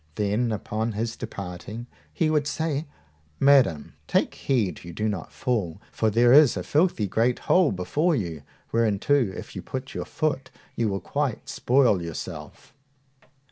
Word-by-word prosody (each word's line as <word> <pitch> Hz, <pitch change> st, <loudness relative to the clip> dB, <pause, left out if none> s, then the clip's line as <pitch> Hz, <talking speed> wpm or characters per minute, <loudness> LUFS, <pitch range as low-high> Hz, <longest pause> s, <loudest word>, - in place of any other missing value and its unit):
Then, 105 Hz, +3 st, 0 dB
upon 110 Hz, +1 st, -2 dB
his 115 Hz, +2 st, -2 dB
departing, 100 Hz, +5 st, -7 dB, 0.3 s
he 155 Hz, -2 st, +1 dB
would 150 Hz, -2 st, +1 dB
say, 155 Hz, 0 st, -2 dB, 0.5 s
Madam, 135 Hz, -, +4 dB
take -, -, +1 dB
heed 110 Hz, -, -1 dB
you 85 Hz, -1 st, -9 dB
do 110 Hz, +5 st, -1 dB
not 100 Hz, -6 st, -4 dB
fall, 105 Hz, -, -2 dB
for 110 Hz, -, +1 dB
there 120 Hz, +3 st, +5 dB
is 145 Hz, -2 st, +7 dB
a -, -, -3 dB
filthy 155 Hz, -, +2 dB
great 115 Hz, +5 st, +1 dB
hole 180 Hz, -4 st, +3 dB
before 150 Hz, -, 0 dB
you, 85 Hz, -, -3 dB, 0.3 s
whereinto 115 Hz, +3 st, +1 dB
if 120 Hz, -10 st, -1 dB
you -, -, -4 dB
put 130 Hz, 0 st, -6 dB
your -, -, -4 dB
foot, 150 Hz, -4 st, -2 dB, 0.3 s
you 115 Hz, -2 st, +1 dB
will 95 Hz, -1 st, -2 dB
quite 140 Hz, -5 st, -2 dB
spoil 125 Hz, -7 st, +3 dB
yourself. 85 Hz, -2 st, -8 dB
115 Hz, 150 wpm, -25 LUFS, 100-140 Hz, 0.5 s, is